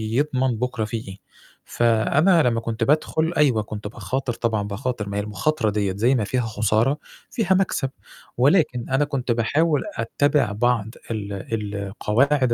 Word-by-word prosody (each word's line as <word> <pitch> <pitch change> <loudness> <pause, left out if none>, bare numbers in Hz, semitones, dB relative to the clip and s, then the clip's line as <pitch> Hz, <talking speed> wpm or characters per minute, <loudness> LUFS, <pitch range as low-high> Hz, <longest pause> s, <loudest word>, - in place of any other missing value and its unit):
يضمن 130 -4 +1
بُكرة 125 -2 -2
فيه 110 -1 -5
إيه. 95 - -8 0.5
فأنا 140 - +3
لمّا 120 -3 +2
كنت 115 0 -3
بادخُل 155 +4 +1
أيوه 130 -8 +3
كنت 105 0 -6
باخاطر 120 +4 -3
طبعًا 115 -3 -1
باخاطر 105 +1 -3
ما 100 - -3
هي - - +1
المُخاطرة 110 +4 0
دِيّة 100 -2 0
زي 120 +5 +3
ما 115 - +1
فيها 125 +5 -1
خسارة 110 +4 +1 0.3
فيها 215 -6 +1
مكسب، 185 -8 +1 0.5
ولكن 135 -3 +2
أنا 135 +3 +2
كنت 135 -4 -2
باحاول 145 +6 +2
أتّبع 140 +2 +1
بعض 115 +1 +1 0.3
ال 105 -2 -4 0.4
القواعد 120 +7 +1
120 Hz, 150 wpm, -23 LUFS, 110-140 Hz, 0.5 s, فأنا